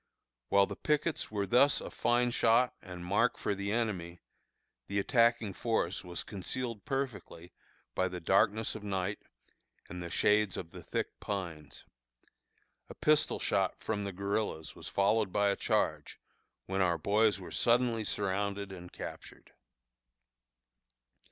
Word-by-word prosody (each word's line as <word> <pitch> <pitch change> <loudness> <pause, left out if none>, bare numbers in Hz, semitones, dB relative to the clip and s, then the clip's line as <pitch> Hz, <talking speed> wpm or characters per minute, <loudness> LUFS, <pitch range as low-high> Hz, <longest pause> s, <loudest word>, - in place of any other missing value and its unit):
While 100 0 +5
the - - -6
pickets 150 +1 0
were 100 -2 -1
thus 125 +8 +4
a - - -7
fine 120 0 +2
shot 120 +1 +3
and 90 -2 -8
mark 105 +6 +2
for - - -1
the 100 +1 -3
enemy, 95 -7 -2 0.7
the 100 - -2
attacking 115 -1 +3
force 110 -5 -1
was 90 -2 -5
concealed 110 +3 -4
perfectly 130 - -4 0.4
by 95 - +1
the 90 -1 -5
darkness 105 +5 +2
of 110 - -7
night 95 0 -2 0.7
and 90 +1 -7
the 85 - -5
shades 105 +1 +2
of 80 - -6
the - - -9
thick - - -4
pines. 85 -7 -5 1.1
A - - -9
pistol 150 0 +2
shot - - 0
from 105 - -1
the 100 - -3
guerillas 100 -3 -2
was - - -9
followed 100 0 +2
by 100 +1 +3
a - - 0
charge, - - -1 0.5
when 95 0 -1
our 85 -2 +3
boys 105 +4 +2
were 90 - -9
suddenly 120 -2 +2
surrounded 100 0 -1
and 90 -2 -9
captured. - - -9
100 Hz, 140 wpm, -32 LUFS, 95-115 Hz, 1.1 s, While